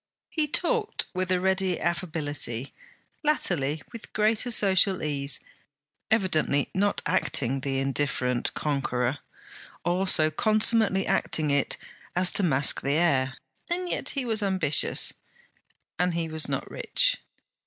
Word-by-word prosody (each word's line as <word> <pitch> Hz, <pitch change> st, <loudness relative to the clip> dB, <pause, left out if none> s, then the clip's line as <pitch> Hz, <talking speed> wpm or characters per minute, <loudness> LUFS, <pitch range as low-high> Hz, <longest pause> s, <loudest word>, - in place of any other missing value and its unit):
He 310 Hz, -2 st, 0 dB
talked 445 Hz, -, -1 dB
with 185 Hz, 0 st, -2 dB
a 185 Hz, -, +2 dB
ready 190 Hz, -1 st, 0 dB
affability, 145 Hz, -7 st, -2 dB, 0.5 s
latterly 150 Hz, -, 0 dB
with 230 Hz, -2 st, -11 dB
greater 215 Hz, +3 st, +1 dB
social 195 Hz, -4 st, +3 dB
ease; 140 Hz, -2 st, -1 dB, 0.7 s
evidently 160 Hz, -9 st, +1 dB
not 200 Hz, +2 st, 0 dB
acting 135 Hz, +1 st, 0 dB
the 135 Hz, 0 st, -2 dB
indifferent 135 Hz, -2 st, -1 dB
conqueror, 135 Hz, -2 st, -1 dB, 0.7 s
or 180 Hz, +2 st, 0 dB
so 155 Hz, -3 st, +4 dB
consummately 215 Hz, +1 st, +2 dB
acting 155 Hz, -2 st, 0 dB
it 140 Hz, -1 st, +1 dB, 0.4 s
as 180 Hz, 0 st, +5 dB
to -, -, 0 dB
mask 140 Hz, -6 st, +3 dB
the 140 Hz, -, -1 dB
air. 140 Hz, -5 st, +1 dB, 0.3 s
And 360 Hz, +1 st, 0 dB
yet -, -, +1 dB
he 265 Hz, -, 0 dB
was 220 Hz, -2 st, +1 dB
ambitious, 190 Hz, -7 st, +3 dB, 0.9 s
and 180 Hz, -1 st, +1 dB
he 165 Hz, -1 st, -1 dB
was 160 Hz, -1 st, -1 dB
not -, -, -3 dB
rich. -, -, +1 dB
175 Hz, 125 wpm, -26 LUFS, 140-205 Hz, 0.9 s, as